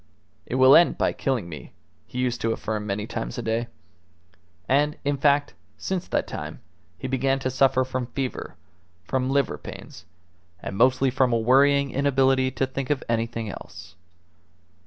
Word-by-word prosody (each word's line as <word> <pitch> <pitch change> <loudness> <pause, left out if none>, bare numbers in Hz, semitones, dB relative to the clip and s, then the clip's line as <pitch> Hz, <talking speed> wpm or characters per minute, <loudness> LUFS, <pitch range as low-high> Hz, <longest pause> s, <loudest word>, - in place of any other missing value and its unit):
"It - - -3
will 130 +1 +7
end 170 - +5
by - - +1
killing 130 -9 -1
me," 80 -3 -10 0.3
he - - -9
used 125 -2 -1
to 115 - +1
affirm 105 -1 -3
many 100 +1 -2
times - - -5
a - - -3
day. 115 +1 -1 1.0
And, 145 +3 +2
in 145 0 +1
fact, 145 +1 +2 0.2
since 185 -2 -3
that - - 0
time - - -7 0.4
he 130 - -5
began 135 +1 +1
to 130 -1 -2
suffer 130 0 +3
from 130 -1 -3
fever, 130 0 -4 0.5
from 130 +6 -1
liver 140 0 0
pains, - - -10 0.5
and 95 - -6
mostly 130 +4 +3
from 130 -1 +2
a 115 - +3
worrying 140 +4 +4
inability 135 -1 +2
to 135 - -1
think 130 0 -5
of 145 -3 0
anything 115 -1 -1
else. 90 -2 -11
130 Hz, 160 wpm, -25 LUFS, 115-135 Hz, 1.0 s, will